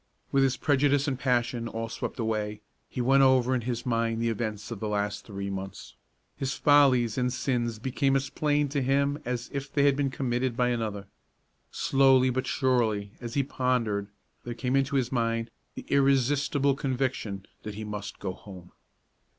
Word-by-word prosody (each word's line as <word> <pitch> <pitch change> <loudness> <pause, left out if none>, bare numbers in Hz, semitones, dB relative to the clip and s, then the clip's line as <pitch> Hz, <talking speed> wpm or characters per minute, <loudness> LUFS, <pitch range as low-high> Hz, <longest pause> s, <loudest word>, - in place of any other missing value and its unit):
With 135 - +3
his 135 -1 +2
prejudice 145 -1 +2
and 130 -3 -1
passion 120 -2 0
all 115 0 -4
swept 115 - -5
away, 105 -2 -2 0.3
he 125 - -3
went 135 +3 +4
over 130 -1 +4
in 125 - +1
his 120 0 -3
mind 115 -2 0
the 115 0 +1
events 110 -1 -3
of 115 - -5
the 110 - -3
last 105 -1 -2
three 100 -2 -5
months. 95 -1 -7 0.4
His 135 0 -2
follies 130 -5 +4
and 125 0 +1
sins 120 -3 -1
became 135 +4 0
as 135 0 -1
plain 150 -1 +1
to 140 0 -1
him 140 +2 +1
as 120 -1 -3
if 140 0 -4
they 140 - +2
had 140 -1 +4
been 140 -1 0
committed 125 -2 -1
by 125 0 +2
another. 110 -4 -2 0.6
Slowly 135 -1 +4
but 130 +1 -2
surely, 115 -7 +1
as 120 0 -6
he 140 - +3
pondered, 125 -7 0 0.4
there 120 -1 -5
came 125 +2 -1
into 135 +1 +1
his 125 -3 +1
mind 115 -2 -1 0.2
the - - -8
irresistible 140 +1 +3
conviction 130 -7 -2 0.2
that 105 -1 -7
he 110 - -5
must 105 -1 -6
go 95 -2 -4
home. 90 -2 -12
125 Hz, 175 wpm, -28 LUFS, 115-135 Hz, 0.6 s, went